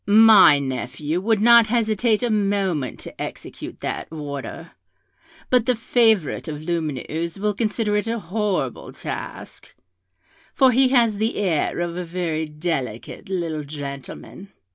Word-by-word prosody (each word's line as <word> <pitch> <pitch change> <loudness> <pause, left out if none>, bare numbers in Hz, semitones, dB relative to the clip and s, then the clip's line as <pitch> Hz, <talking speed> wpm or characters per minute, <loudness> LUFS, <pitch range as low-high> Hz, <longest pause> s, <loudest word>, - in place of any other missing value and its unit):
My 210 -7 +8
nephew 140 +4 -3
would 220 0 +1
not 235 0 +7
hesitate 220 0 +1
a 240 - +1
moment 195 - 0
to - - -9
execute - - -8
that - - -4
order; 145 -3 -7 0.8
but 250 -3 +3
the 250 - +3
favourite 225 - +1
of 150 -2 -5
Lumineuse 160 0 -3
will 210 +1 0
consider 210 0 -1
it 210 +2 0
a 230 +1 -1
horrible 200 - -3
task, - - -8 0.8
for 265 -1 +5
he 260 +2 +4
has 235 -5 +3
the 220 +2 0
air 180 -7 0
of 170 -1 -3
a 180 - -3
very 165 -2 -3
delicate 150 - -4
little 165 -5 -2
gentleman. 145 +6 -8
190 Hz, 135 wpm, -22 LUFS, 155-220 Hz, 0.8 s, My